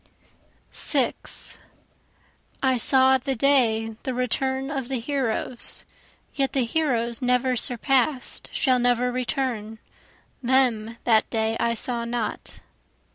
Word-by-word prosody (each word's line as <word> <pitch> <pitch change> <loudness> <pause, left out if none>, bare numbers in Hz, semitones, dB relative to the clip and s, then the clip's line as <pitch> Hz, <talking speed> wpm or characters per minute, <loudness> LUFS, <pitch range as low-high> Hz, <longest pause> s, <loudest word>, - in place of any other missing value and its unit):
6 - - -2 1.0
I 260 -1 +3
saw 260 +2 +5
the 270 +1 -2
day 225 -4 +2
the 260 - -4
return 265 +2 -1
of 270 -4 -3
the 265 -1 -2
heroes, 255 -2 0 0.5
(Yet 275 -2 -1
the 265 -3 +1
heroes 235 -4 -1
never 250 0 +1
surpass'd 255 +3 0
shall 255 -3 +2
never 245 0 +1
return, 245 -4 -3 0.6
Them 240 -3 +1
that 220 -3 +3
day 220 -1 -1
I 235 0 +1
saw 235 +1 0
not.) 235 -2 -5
250 Hz, 110 wpm, -24 LUFS, 230-265 Hz, 1.0 s, saw